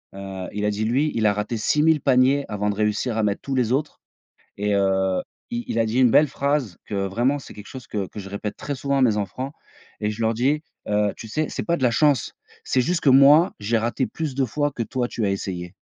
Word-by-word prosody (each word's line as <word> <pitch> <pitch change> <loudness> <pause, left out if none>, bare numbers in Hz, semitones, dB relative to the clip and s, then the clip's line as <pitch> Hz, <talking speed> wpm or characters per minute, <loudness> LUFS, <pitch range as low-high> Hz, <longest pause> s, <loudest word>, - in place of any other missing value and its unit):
heu, 95 -1 -6
il 105 +1 -2
a 105 - +2
dit 105 +1 -2
lui, 135 +7 +1
il 110 -1 +1
a - - +4
raté 105 +3 -3
6000 150 +7 +2
paniers, 135 +2 +3
avant 105 0 -1
de - - -5
réussir 105 +3 0
à - - +2
mettre 105 -1 0
tous 140 - -4
les 120 -3 +1
autres 145 +3 -1 0.6
et 105 0 0
heu, 95 -1 +1 0.3
i 240 0 -2
il 115 - -1
a 115 - +3
dit 115 +3 0
une 125 -3 +5
belle 150 - +6
phrase, 140 - -1
que 105 - -5
vraiment 120 +8 0
c'est 135 - -12
quelque 105 -1 -11
chose 130 -3 -10
que 100 -3 -3
que 105 - -9
je 100 - -8
répète 100 +1 -5
très 145 - -4
souvent 140 +1 -1
à - - +2
mes 115 -5 +4
enfants 125 +8 -4 0.5
et 105 0 0
je 105 +2 -6
leur 110 0 +2
dis, 140 +7 +1 0.3
heu: 105 -1 +1
«Tu 110 - -8
sais? 155 +6 -1
C'est - - -4
pas 170 0 0
de 130 - -4
la 125 - +4
chance. 145 +3 +2 0.3
C'est 130 - +2
juste 170 +7 0
que 140 - +4
moi, 140 +6 +6
j'ai 110 +3 0
raté 120 +4 -1
plus 155 -5 -4
de 135 - +1
fois 145 +5 -1
que 120 - -3
toi 125 +1 -2
tu 115 -3 -2
as - - +1
essayé». 90 -2 -4
115 Hz, 255 wpm, -23 LUFS, 105-140 Hz, 0.6 s, belle